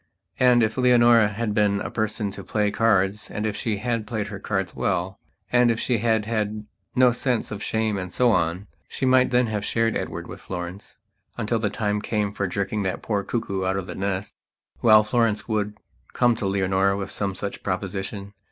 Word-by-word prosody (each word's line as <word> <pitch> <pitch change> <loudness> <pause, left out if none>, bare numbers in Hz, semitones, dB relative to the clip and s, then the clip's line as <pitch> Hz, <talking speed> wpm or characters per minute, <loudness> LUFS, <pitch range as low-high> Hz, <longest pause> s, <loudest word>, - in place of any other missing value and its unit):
And, 125 -2 +5
if 110 +3 -1
Leonora 120 -3 +6
had 105 +1 -2
been 105 -1 +2
a - - -4
person 110 -1 -2
to 100 - -8
play 105 +1 0
cards 105 -2 +1
and 105 - -3
if 105 -2 -1
she 110 -3 -2
had 115 0 -2
played 110 -4 -3
her 100 -1 -7
cards 95 -2 -2
well, 95 +3 -1 0.3
and 125 -1 +5
if 115 -1 +1
she 120 -3 0
had 110 -1 +1
had 105 -1 -2 0.3
no 125 -1 +6
sense 120 -1 -1
of 105 -1 -5
shame 110 -3 -1
and 90 -1 -6
so 125 +3 +3
on, 90 0 0 0.2
she - - -3
might 130 0 +4
then 125 0 +3
have 105 -3 -2
shared 115 +1 0
Edward - - -4
with - - -10
Florence 90 +2 -7 0.4
until 115 0 0
the 110 -2 0
time 105 0 -1
came 105 -2 -1
for 100 -1 -1
jerking 100 +3 -2
that 95 -2 -3
poor 105 -3 -1
cuckoo 100 -3 -2
out 95 +1 0
of 95 - -3
the - - -6
nest. 100 +1 -3 0.5
Well, 110 -2 +7
Florence 115 -1 +1
would 105 -2 -1 0.4
come 120 -2 +3
to 100 - -1
Leonora 95 0 +1
with 95 -1 -4
some 100 -2 -2
such 100 0 -5
proposition. 100 +1 -4
105 Hz, 200 wpm, -24 LUFS, 100-115 Hz, 0.5 s, Well